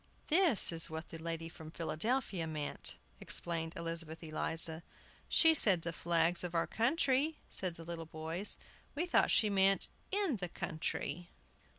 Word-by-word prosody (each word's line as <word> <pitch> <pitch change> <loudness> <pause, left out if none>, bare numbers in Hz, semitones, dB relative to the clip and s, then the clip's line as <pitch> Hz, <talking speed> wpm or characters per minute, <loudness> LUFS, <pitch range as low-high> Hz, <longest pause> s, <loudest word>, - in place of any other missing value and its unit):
"That 325 - +7
is 165 -1 +2
what 160 +1 -7
the 165 - -9
lady 165 0 -4
from 160 -1 -11
Philadelphia 170 +4 -2
meant," 150 -2 -5 0.2
explained 165 -1 +1
Elizabeth 165 -1 -3
Eliza. 160 +1 -3 0.5
"She 325 -1 +6
said 195 - +5
the 170 - -4
flags 170 +1 +1
of 175 -1 -5
our 165 - +1
country," 275 +4 +1
said 185 -3 -2
the 165 - -11
little 165 -1 -6
boys. 160 +5 -2 0.4
"We 320 +5 -1
thought 355 - +2
she 215 -2 +3
meant 195 0 +3 0.2
'in 390 - 0
the 180 -2 -5
country. 165 +1 -4
170 Hz, 150 wpm, -34 LUFS, 165-215 Hz, 0.5 s, That